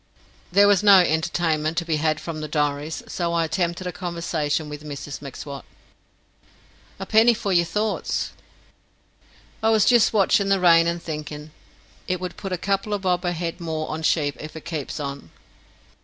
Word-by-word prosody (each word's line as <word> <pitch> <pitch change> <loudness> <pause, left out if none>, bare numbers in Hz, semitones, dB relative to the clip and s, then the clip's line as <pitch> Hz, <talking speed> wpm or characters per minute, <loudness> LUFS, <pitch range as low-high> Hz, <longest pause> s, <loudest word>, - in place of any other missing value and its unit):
There 200 +3 +6
was 205 -3 +4
no 200 -2 +8
entertainment 160 -1 0
to 170 - 0
be 160 -2 0
had 155 0 0
from 160 -2 -6
the 155 - -4
diaries, 150 +1 -2
so 170 -1 -2
I 170 -1 +2
attempted 175 +2 -2
a 180 - -2
conversation 170 -4 -2
with 150 0 -8
Mrs 145 -1 -7
M'Swat. 140 0 -8 1.4
"A 195 - -4
penny 225 +3 +5
for 200 -2 -2
your 170 -1 +4
thoughts." 210 +6 -2 1.3
"I 220 - +3
wuz 220 -1 +4
jist 240 -3 +5
watchin' 200 -1 +3
the 195 -1 +3
rain 170 -2 +5
and 170 0 -2
thinkin' 150 -1 -6 0.6
it 185 -1 -1
would 180 -1 -5
put 195 - -6
a 185 - -1
couple 200 +3 -1
a - - 0
bob 180 -2 0
a 175 - +1
head 170 0 -4
more 160 -2 -3
on 155 +1 -4
sheep 150 -3 +1
if 155 +1 -9
it 160 - -9
keeps 155 -5 -4
on." 140 - -6
170 Hz, 175 wpm, -23 LUFS, 155-185 Hz, 1.4 s, no